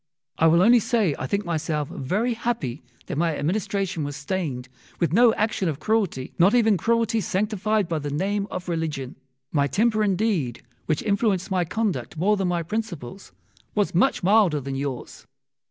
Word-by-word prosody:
I 165 - +5
will 170 +2 +5
only 240 +4 +6
say 220 - +1
I 130 - -3
think 200 +5 -1
myself 155 -3 -1
very 210 - -1
happy 225 - -3 0.2
that 145 - -3
my 165 -2 +1
administration 185 +1 -1
was 145 0 -4
stained 145 -5 -3 0.3
with 170 -3 +1
no 235 +3 +6
action 210 -4 0
of 150 -2 -4
cruelty, 195 -9 -1
not 190 +7 +5
even 225 -3 +4
cruelty 230 +3 +1
sanctified 210 +1 0
by 165 -2 -1
the 145 0 -4
name 195 +7 -1
of 180 - -6
religion. 155 -6 -3 0.4
My 140 -2 +2
temper 215 - +2
indeed, 190 - 0 0.2
which 155 -2 0
influenced 200 -3 0
my 180 -2 +1
conduct 175 - -2
more 200 +6 +3
than 195 -2 -1
my 175 -1 0
principles, 195 - -5 0.4
was 205 -1 +1
much 195 +5 +2
milder 190 -5 +4
than 135 0 -5
yours. 135 -2 -5
185 Hz, 170 wpm, -24 LUFS, 150-215 Hz, 0.4 s, only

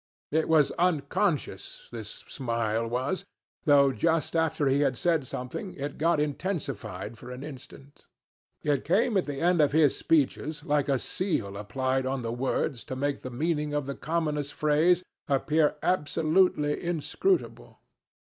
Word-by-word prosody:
It 160 +2 +1
was 155 -3 +4
unconscious, 175 0 0
this 110 -3 -6 0.2
smile 115 -2 -1
was, 130 +11 -2 0.4
though 140 -3 +6
just 165 +4 0
after 160 -2 +1
he 135 +1 +3
had 135 -4 +1
said 160 -4 +1
something 125 - -5
it 140 0 -5
got 165 0 +3
intensified 140 - -3
for - - -10
an 125 +2 -7
instant. 145 0 -12 0.6
It 145 -3 +1
came 215 - +2
at 190 - +2
the 140 -1 -4
end 175 -1 +3
of 145 -2 +3
his 155 -3 +4
speeches 150 0 0
like 145 -2 +1
a 135 - +3
seal 120 - -2
applied 130 +6 -1
on 130 -1 -2
the 115 0 -2
words 125 0 -1
to 130 - -5
make 140 +2 -1
the 130 - -6
meaning 150 +3 -1
of 145 -2 0
the 140 - -3
commonest 150 -2 -2
phrase 165 +4 +3 0.3
appear 150 +2 +2
absolutely 155 -2 +2
inscrutable. 175 - -1
145 Hz, 150 wpm, -28 LUFS, 130-165 Hz, 0.6 s, though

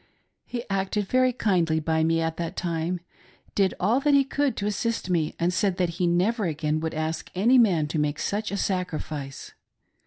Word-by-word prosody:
He 240 0 -5
acted 195 +1 -1
very 255 +2 +3
kindly 175 -9 +1
by 160 0 +1
me 165 0 +2
at 165 0 -2
that 170 +1 -4
time; 170 0 -2 0.5
did 195 -2 +2
all 220 +8 +3
that 285 0 +3
he 280 - +6
could 280 0 -1
to 200 - -2
assist 210 -1 -1
me, 160 -3 0
and 175 +1 +1
said 190 -1 +1
that 180 -3 +1
he 180 - +2
never 195 +6 +1
again 155 -1 -1
would 160 0 -3
ask 155 +1 -3
any 235 +8 +5
man 180 -10 +4
to 155 - -1
make 150 0 0
such 210 +5 -2
a 200 - -2
sacrifice. 155 -8 -3
180 Hz, 190 wpm, -26 LUFS, 160-210 Hz, 0.5 s, he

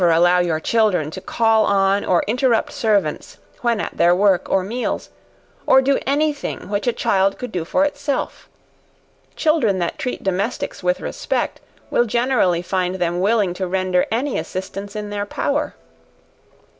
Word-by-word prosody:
Never 175 -2 +4
allow 175 +2 +4
your 170 -3 0
children 190 -6 +1
to 190 - -7
call 225 +2 +2
on 195 0 +2
or 175 - +2
interrupt 240 +1 +1
servants 200 -9 -1 0.2
when 235 -3 +1
at - - -5
their 175 +1 +4
work 195 -1 +2
or 190 - +2
meals, 235 +6 -3 0.6
to 265 - +7
do 275 +1 +2
any 295 +2 +2
thing 285 - -6
which 205 +3 -2
a - - +4
child 195 -4 +1
could 250 -3 -6
do 180 -4 -2
for 280 - +1
itself; 285 -1 -3 0.9
children 305 - +2
that 175 -2 -3
treat 250 - -4
domestics 195 +5 -2
with 180 0 0
respect, - - -3 0.3
will 240 - +3
generally 235 -7 +1
find 185 0 -1
them 175 -1 -1
willing 200 -1 +2
to 185 +1 -3
render 185 0 +1
any 250 +4 -1
assistance 195 +2 -6
in 210 -1 -5
their 205 0 -3
power. 285 +7 -2
200 Hz, 160 wpm, -20 LUFS, 180-235 Hz, 0.9 s, to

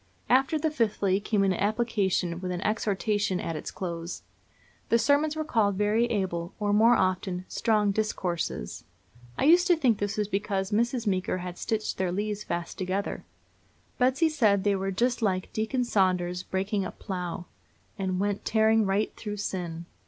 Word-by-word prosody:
After 270 +5 +4
the 310 +1 0
fifthly 205 -7 +1
came 205 -1 +1
an 195 -1 +3
application, 200 -4 0
with 180 0 -4
an 180 0 -3
exhortation 205 -2 0
at 165 - -3
its - - -5
close. 170 -2 -5 0.7
The 230 - +5
sermons 285 +6 +2
were 310 - -1
called 220 -9 +1
very 210 +4 +2
able, 185 -6 -2
or, 205 -1 +1
more 225 +3 +6
often, 185 -1 0
"strong 215 -3 +1
discourses." 180 - -2 0.5
I - - 0
used 350 +5 +6
to 355 - +5
think 255 -9 +2
this 205 +1 -2
was 210 -1 0
because 195 -1 -2
Mrs. 235 +2 +1
Meeker 185 -2 0
had 180 -1 -6
stitched 215 -3 -2
their 185 -2 0
leaves 205 +2 -2
fast 170 -2 -4
together. 190 +2 -2 0.7
Betsy 260 +6 +3
said 215 -11 +2
they 205 -1 +2
were 195 0 -2
just 235 +6 0
like 185 -3 -1
Deacon 225 +4 0
Saunders's 180 -5 +1
breaking 195 +2 -2
up 185 - -7
plough, 180 -2 -5 0.5
"and 185 -2 -2
went 205 0 -1
tearing 220 -1 +3
right 195 +2 0
through 210 -1 -5
sin." 175 -4 -4
205 Hz, 165 wpm, -27 LUFS, 185-225 Hz, 0.7 s, more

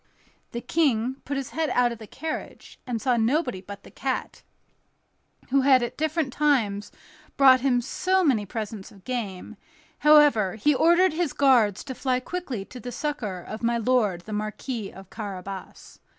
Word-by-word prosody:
The 235 - -4
King 260 -6 +1
put 280 0 -3
his 270 -2 -4
head 320 -1 -1
out 245 -1 +2
of 235 - -7
the 220 - -10
carriage, 315 +7 -7
and 240 -2 -2
saw 250 0 +1
nobody 245 - 0
but 200 +1 -10
the - - -14
cat, - - -3 1.1
who 275 +1 +3
had 260 -2 +5
at 240 - -4
different 310 -3 -1
times 230 -9 +1 0.5
brought 265 -2 +7
him 250 -2 +2
so 375 +9 +1
many 255 -10 +2
presents 210 -1 -6
of 195 -2 -18
game; 220 -8 -5 0.4
however, 295 -11 +5
he 295 +8 +2
ordered 340 +5 +4
his 330 -3 -1
guards 240 -8 +3
to 265 - -6
fly 255 0 0
quickly 260 - -5
to 250 - -11
the 245 0 -7
succor 235 -10 -3
of 215 +5 -8
my 235 0 +1
lord 220 -6 +1
the 215 +4 -8
Marquis 215 +1 -4
of 190 0 -13
Carabas. 195 -3 -8
245 Hz, 165 wpm, -25 LUFS, 210-285 Hz, 1.1 s, brought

